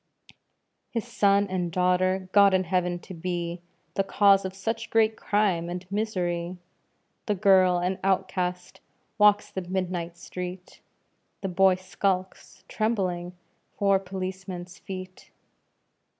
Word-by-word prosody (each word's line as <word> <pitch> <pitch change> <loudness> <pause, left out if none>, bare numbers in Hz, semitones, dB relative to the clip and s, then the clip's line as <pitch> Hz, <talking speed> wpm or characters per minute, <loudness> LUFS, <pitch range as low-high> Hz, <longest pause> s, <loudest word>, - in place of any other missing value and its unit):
His 230 -2 -3
son 200 0 +3
and 180 -2 -2
daughter 185 +1 +1
God 200 -1 +6
in 185 - +2
heaven 180 0 0
to - - -10
be 175 0 -4 0.3
The 195 - +1
cause 195 0 +4
of 190 0 -5
such 220 +4 -3
great 220 -1 +3
crime 195 -7 0
and 180 +1 -5
misery! 180 -4 -2 0.7
The 210 - +1
girl, 185 -2 +5
an 180 +2 -1
outcast, 185 -2 -1 0.4
walks 210 0 +5
the 190 - -3
midnight 180 -2 -3
street; 180 +1 -8 0.6
The 195 - -2
boy 190 +1 +4
skulks, 185 0 -3
trembling, 185 -6 -1 0.4
'fore 200 -1 +3
policeman's 185 -1 -6
feet. 185 -1 -9
185 Hz, 120 wpm, -26 LUFS, 180-195 Hz, 0.7 s, God